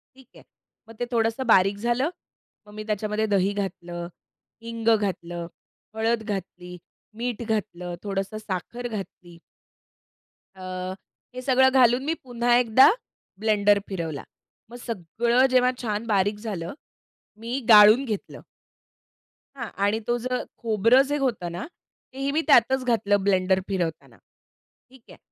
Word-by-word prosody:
ठीक 265 -2 -18
आहे. - - -15 0.5
मग 225 - -12
ते 245 - -1
थोडंसं 230 +2 0
बारीक 195 +1 +4
झालं. 240 +7 0 0.6
मग 210 - -14
मी 215 0 -7
त्याच्यामध्ये 210 +1 -1
दही 200 0 +2
घातलं, 175 -4 -5 0.5
हिंग 230 0 -2
घातलं, 175 -5 -4 0.5
हळद 225 0 0
घातली, 180 -3 -6 0.4
मीठ 245 -1 -3
घातलं, 180 -5 -3
थोडंसं 195 +1 -3
साखर 220 +6 -5
घातली. 185 -5 -8 1.2
अ, 185 0 -5 0.4
हे 255 - -6
सगळं 260 0 +4
घालून 250 -1 +4
मी 315 - 0
पुन्हा 240 -1 +1
एकदा 245 +1 +6 0.5
ब्लेंडर 205 -1 +3
फिरवला. 165 -7 -4 0.5
मग 240 - -11
सगळं 235 +5 +1
जेव्हा 250 0 +4
छान 215 -2 -3
बारीक 205 -1 +1
झालं, 195 -7 -5 0.7
मी 235 +4 -3
गाळून 215 +3 +8
घेतलं 215 -5 -5 1.1
हां? 240 -4 -6
आणि 205 +2 +1
तो 240 0 +1
ज 240 +1 -5 0.3
खोबरं 230 +2 +3
जे 290 - 0
होत 240 -8 -1
ना, 175 +2 -5 0.5
तेही 270 +1 -2
मी 310 +3 +1
त्यातच 265 -1 +4
घातलं 205 -5 +1
ब्लेंडर 190 -1 +2
फिरवताना, 175 -5 -4 0.7
ठीक 260 -1 -18
आहे? - - -14
215 Hz, 130 wpm, -25 LUFS, 195-240 Hz, 1.2 s, गाळून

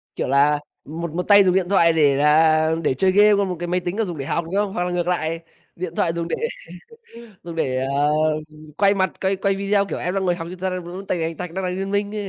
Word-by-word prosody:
Kiểu - - -2
là, 145 +2 +3 0.3
một 165 +2 -6
một 180 +1 -2
tay 205 -1 +7
dùng 185 -1 +2
điện 185 -1 +1
thoại 170 -4 +4
để 145 -4 +3
là 155 +2 +3
để - - +2
chơi 185 +8 +2
game, 205 +1 +5
còn 200 -2 0
một 180 - -3
cái 175 - -4
máy 180 +1 0
tính 180 +3 -5
là 220 - +1
dùng 175 -4 -6
để 135 - -5
học, 170 +2 -2
đúng 180 +4 -6
không? 205 -1 0
Hoặc 175 - -1
là 180 - -2
ngược 175 0 -2
lại, 165 -2 -1 0.4
điện 170 -1 -6
thoại 165 - +1
dùng 170 0 -3
để - - -1 1.1
dùng 170 -1 -7
để, 130 -5 -1
à, 130 - -1 0.6
ừm, 155 0 -15
quay 200 0 +3
mặt, 190 -1 +1
quay 190 0 0
quay 195 +1 0
video, 200 +1 +1
kiểu, - - -5
em 180 +2 -3
đang 195 -1 -1
ngồi 175 -1 +1
học 165 -1 -7
nhưng 185 - -9
ta 190 0 -2
đang 180 -1 -5
bấm 185 +3 -8
tạch 180 - -1
tạch 160 0 -1
tạch 180 -1 -4
tạch, 165 - -15
đang 190 0 -3
đánh 180 0 -2
Liên 195 +1 -4
Minh, 205 +1 -1
ơ. - - -2
180 Hz, 290 wpm, -21 LUFS, 160-195 Hz, 1.1 s, tay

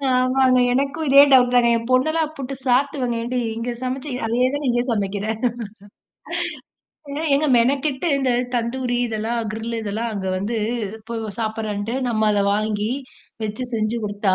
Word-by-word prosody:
ஆமாங்க. 255 0 +3
எனக்கும் 280 +4 -1
இதே 280 +1 +9
டவுட் 250 -1 +6
தாங்க. 240 -1 +5
என் 230 - -6
பொண்ணெல்லாம் 315 +4 +2
போட்டு 275 0 -5
சாத்துவேங்க. 255 -1 +1
"ஏன்டி 250 +1 -1 0.2
இங்க 235 +1 -2
சமைச்சு 260 +2 -3 0.2
அதே 240 +3 +1
தானே 285 -1 -2
இங்க 240 0 +1
சமைக்கிறேன்." 205 +1 -2 2.0
ஏங்க, 300 +2 +2
மெனக்கெட்டு 275 +5 +1
இந்த 270 -2 +1 0.2
தந்தூரி 245 +1 -1
இதெல்லாம், 225 +1 -2
கிரில் 230 +1 -4
இதெல்லாம் 220 +3 -2
அங்க 190 -1 -3
வந்து 205 +5 -2 0.4
இப்ப 225 +2 -8 0.2
சாப்பிடுறான்ட்டு, 220 0 -2
நம்ம 220 -2 +1
அதை 205 - +2
வாங்கி 215 0 -1 0.5
வச்சு 215 +3 -4
செஞ்சு 220 +1 0
குடுத்தா, 205 -2 +1
235 Hz, 140 wpm, -22 LUFS, 220-260 Hz, 2.0 s, இதே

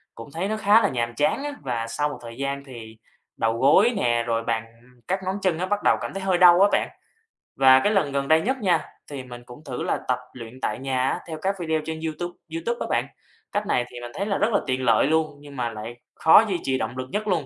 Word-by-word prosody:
cũng 115 +4 -10
thấy 175 +4 -2
nó 220 +1 -2
khá 215 +2 +5
là 205 - +2
nhàm 120 -2 -2
chán 150 - +1
á 290 - -3
và 120 -4 -3
sau 150 +5 -1
một - - -7
thời 115 0 -10
gian 140 0 -3
thì 115 -5 -11 0.4
đầu 115 0 0
gối 195 - +5
nè, 120 -8 +1
rồi 115 -1 0
bàn 115 -1 -1 0.4
các 190 +2 0
ngón 190 +1 -2
chân 180 -4 +1
bắt 205 0 -1
đầu - - +4
cảm - - -5
thấy 195 0 -5
hơi 185 -2 +2
đau 180 0 +7
á 200 - +7
bạn. - - +1 0.7
Và 130 -1 +7
cái 205 +6 +1
lần 155 -8 +1
gần 140 0 -1
đây 160 +1 +5
nhất 265 +7 -1
nha, 175 -5 +2 0.3
thì 135 -3 -6
mình 120 -1 -11
cũng 120 +5 -13
thử 125 -3 -4
là - - -1
tập 125 -1 +1
luyện 120 +1 -10
tại 105 - -2
nhà 130 -1 0
á - - -2
theo 160 -2 -5
các 195 +3 0
video 160 -2 -1
trên 160 0 -4
YouTube, 170 +2 -4 0.2
YouTube 230 +9 -2
á - - -2
bạn, - - +1 0.5
cách 205 0 -2
này 120 - +1
thì 120 - -9
mình 120 - -7
thấy 200 - -3
là 200 -2 0
rất 215 +3 +1
là 200 - +4
tiện 130 0 -1
lợi 115 +2 +4
luôn, 155 -2 0
nhưng 145 -1 -12
mà 120 -2 -2
lại 110 +2 -7 0.2
khó 160 +6 +7
duy 180 -3 -1
trì 130 -1 0
động 120 +1 -4
lực 130 0 -4
nhất 210 +1 -2
luôn. 170 -8 0
145 Hz, 260 wpm, -24 LUFS, 120-185 Hz, 0.7 s, đau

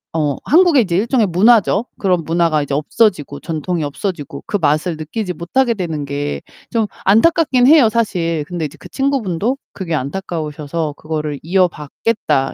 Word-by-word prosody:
어 150 -4 0
한국의 325 -6 +5
이제 175 -3 -2
일종의 230 +1 +2
문화죠. 210 +4 +4
그런 180 -4 +1
문화가 165 -2 +1
이제 140 -1 -4
없어지고 150 -3 0
전통이 165 +1 -3
없어지고 145 -1 -5
그 205 - -1
맛을 155 +2 +1
느끼지 180 +5 -4
못하게 235 +9 0
되는 160 -7 -4
게 145 +1 -3 0.3
좀 225 -2 +1 0.2
안타깝긴 255 - +4
해요, 295 -6 +7
사실. 170 -9 -1
근데 175 -3 -3
이제 145 - -8
그 - - -12
친구분도 260 -4 -1 0.2
그게 175 -4 -5
안타까우셔서 155 0 -4
'그거를 155 -2 -4
이어받겠다.' 165 -2 0
175 Hz, 365 characters per minute, -17 LUFS, 150-225 Hz, 0.3 s, 해요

